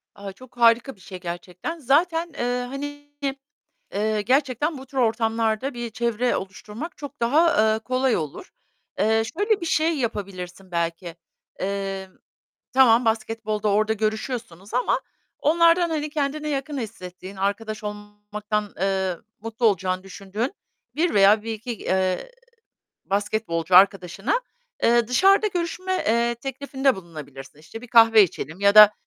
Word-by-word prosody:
A, 200 Hz, -1 st, -7 dB
çok 255 Hz, +4 st, -17 dB
harika 235 Hz, +1 st, +4 dB
bir -, -, -26 dB
şey 185 Hz, -2 st, -9 dB
gerçekten. 180 Hz, -, -6 dB
Zaten, 325 Hz, +4 st, +1 dB
eee, 245 Hz, -1 st, -1 dB
hani, 290 Hz, +2 st, -7 dB, 0.9 s
eee, 215 Hz, +1 st, 0 dB
gerçekten 270 Hz, +5 st, +1 dB
bu 265 Hz, -, -11 dB
tür 265 Hz, +1 st, -6 dB
ortamlarda 225 Hz, +2 st, 0 dB
bir 240 Hz, -1 st, -5 dB
çevre 235 Hz, +2 st, 0 dB
oluşturmak 215 Hz, -, -7 dB
çok 285 Hz, -2 st, -9 dB
daha, 235 Hz, -4 st, +4 dB
eee, 220 Hz, -, -1 dB
kolay 255 Hz, +2 st, 0 dB
olur. 155 Hz, -, -6 dB, 0.5 s
Eee, 220 Hz, +2 st, +3 dB, 0.2 s
şöyle 415 Hz, 0 st, +2 dB
bir 340 Hz, -, -4 dB
şey 320 Hz, 0 st, +2 dB
yapabilirsin 195 Hz, -5 st, -5 dB
belki: 170 Hz, 0 st, -3 dB, 0.5 s
Eee, 195 Hz, 0 st, -3 dB, 0.7 s
tamam 250 Hz, -2 st, +5 dB
basketbolda 220 Hz, -1 st, -1 dB
orada 215 Hz, +2 st, +2 dB
görüşüyorsunuz 215 Hz, -3 st, -4 dB
ama 250 Hz, +1 st, +1 dB, 0.4 s
onlardan, 335 Hz, +2 st, +4 dB
hani, 305 Hz, -1 st, -2 dB
kendine 300 Hz, +1 st, -2 dB
yakın 280 Hz, +1 st, -3 dB
hissettiğin, 190 Hz, -4 st, -7 dB
arkadaş 210 Hz, +2 st, -2 dB
olmaktan, 205 Hz, 0 st, -5 dB
eee, 190 Hz, -2 st, 0 dB, 0.2 s
mutlu 225 Hz, +2 st, -3 dB
olacağını 185 Hz, -3 st, +1 dB
düşündüğün 200 Hz, -, -4 dB, 0.4 s
1 330 Hz, +4 st, +1 dB
veya 205 Hz, +2 st, +5 dB
1-2, 225 Hz, +2 st, -5 dB
eee, 190 Hz, -, -1 dB, 0.7 s
basketbolcu 195 Hz, -4 st, 0 dB
arkadaşına, 195 Hz, -, +3 dB, 0.4 s
eee, 235 Hz, 0 st, +4 dB
dışarıda 390 Hz, -, +4 dB
görüşme, 365 Hz, 0 st, -2 dB
eee, 235 Hz, -1 st, +1 dB
teklifinde 270 Hz, 0 st, -1 dB
bulunabilirsin. 150 Hz, -6 st, -10 dB
İşte, 165 Hz, +9 st, -10 dB
bir 245 Hz, -, -12 dB
kahve 225 Hz, -2 st, +7 dB
içelim 165 Hz, -2 st, -3 dB
ya 200 Hz, 0 st, +4 dB
da, 210 Hz, -1 st, +10 dB
225 Hz, 130 wpm, -24 LUFS, 195-270 Hz, 0.9 s, da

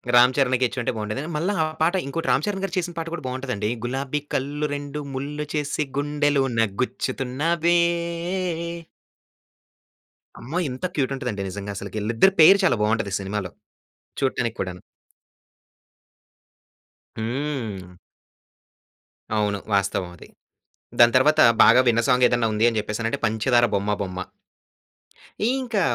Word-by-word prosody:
రామ్ 125 Hz, +1 st, +7 dB
చరణ్‌కిచ్చుంటే 125 Hz, -2 st, +1 dB
బాగుండేదని. 110 Hz, +8 st, -4 dB
మళ్ళా 180 Hz, +6 st, 0 dB
ఆ -, -, +3 dB, 0.2 s
పాట 165 Hz, +3 st, +3 dB
ఇంకోటి 165 Hz, +4 st, -4 dB
'రామ్ 140 Hz, -, +2 dB
చరణ్' 195 Hz, -2 st, -2 dB
గారు 195 Hz, -1 st, -3 dB
చేసిన 175 Hz, -1 st, -2 dB
పాట 165 Hz, 0 st, -3 dB
కూడా 155 Hz, -5 st, -5 dB
బాగుంటదండి. 125 Hz, -5 st, -3 dB, 0.2 s
గులాబీ 135 Hz, +3 st, -2 dB, 0.2 s
కళ్ళు 145 Hz, +3 st, -2 dB
రెండు 145 Hz, +1 st, -5 dB
ముళ్ళు 145 Hz, +3 st, -4 dB
చేసి 150 Hz, 0 st, -1 dB
గుండెలోన 145 Hz, -4 st, +1 dB, 0.2 s
గుచ్చుతున్నావే. 155 Hz, +7 st, 0 dB, 2.6 s
అమ్మో! 135 Hz, +9 st, -5 dB
ఇంత 130 Hz, +7 st, -5 dB
క్యూట్ 140 Hz, -2 st, 0 dB
ఉంటదంటే 125 Hz, -7 st, -4 dB
నిజంగా 100 Hz, +1 st, -6 dB
అసలుకి 100 Hz, +1 st, -6 dB
వీళ్ళిద్దరి 115 Hz, -, +3 dB
పెయిర్ 195 Hz, +6 st, +8 dB
చాలా 120 Hz, -, +3 dB
బాగుంటది 105 Hz, -2 st, 0 dB
సినిమాలో. 95 Hz, -2 st, -4 dB, 0.7 s
చూడటానికి 125 Hz, -4 st, -1 dB
కూడాను. 90 Hz, -1 st, -4 dB, 2.4 s
హ్మ్. 115 Hz, -7 st, -4 dB, 1.4 s
అవును. 105 Hz, -1 st, 0 dB, 0.2 s
వాస్తవం 100 Hz, -2 st, 0 dB
అది. -, -, -13 dB, 0.7 s
దాని 120 Hz, -1 st, +6 dB
తర్వాత 150 Hz, +4 st, +4 dB, 0.2 s
బాగా 125 Hz, -, +7 dB
విన్న 115 Hz, 0 st, +3 dB
సాంగ్ 125 Hz, -1 st, +4 dB
ఏదైనా 120 Hz, -1 st, +1 dB
ఉంది 105 Hz, +1 st, +1 dB
అని 115 Hz, -2 st, -1 dB
చెప్పేసనంటే 110 Hz, +5 st, -3 dB
'పంచదార 120 Hz, +3 st, +3 dB
బొమ్మ 100 Hz, +1 st, 0 dB
బొమ్మ.' 95 Hz, -1 st, -5 dB, 1.3 s
ఇంకా 250 Hz, -6 st, -1 dB
130 Hz, 120 wpm, -23 LUFS, 110-150 Hz, 2.6 s, పెయిర్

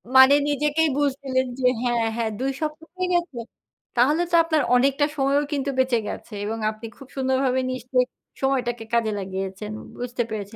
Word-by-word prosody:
মানে 265 Hz, +2 st, +9 dB, 0.2 s
নিজেকেই 300 Hz, +2 st, +2 dB
বুঝ 290 Hz, -1 st, +3 dB
দিলেন 260 Hz, -1 st, 0 dB
যে 250 Hz, -, +3 dB
হ্যাঁ, 240 Hz, -2 st, +1 dB
হ্যাঁ, 225 Hz, -2 st, -1 dB
২ 270 Hz, +1 st, 0 dB
সপ্তাহ 310 Hz, +1 st, -4 dB
হয়ে 365 Hz, 0 st, 0 dB
গেছে? 345 Hz, -7 st, 0 dB, 0.6 s
তাহলে 295 Hz, +8 st, +4 dB
তো -, -, +4 dB
আপনার 315 Hz, -2 st, +1 dB
অনেকটা 275 Hz, +3 st, +3 dB
সময়ও 280 Hz, +1 st, +2 dB
কিন্তু 280 Hz, 0 st, -1 dB
বেঁচে 255 Hz, -3 st, +3 dB
গেছে 225 Hz, -, -7 dB
এবং 225 Hz, +2 st, -3 dB
আপনি 215 Hz, +2 st, -10 dB
খুব 270 Hz, -, -12 dB
সুন্দরভাবে 260 Hz, -1 st, +1 dB
নিশ্চয়ই 255 Hz, 0 st, 0 dB, 0.3 s
সময়টাকে 245 Hz, -4 st, 0 dB
কাজে 225 Hz, -2 st, +2 dB
লাগিয়েছেন 195 Hz, +2 st, -5 dB, 0.3 s
বুঝতে 245 Hz, 0 st, -2 dB
পেরেছে। 210 Hz, 0 st, -5 dB
260 Hz, 165 wpm, -24 LUFS, 235-285 Hz, 0.6 s, মানে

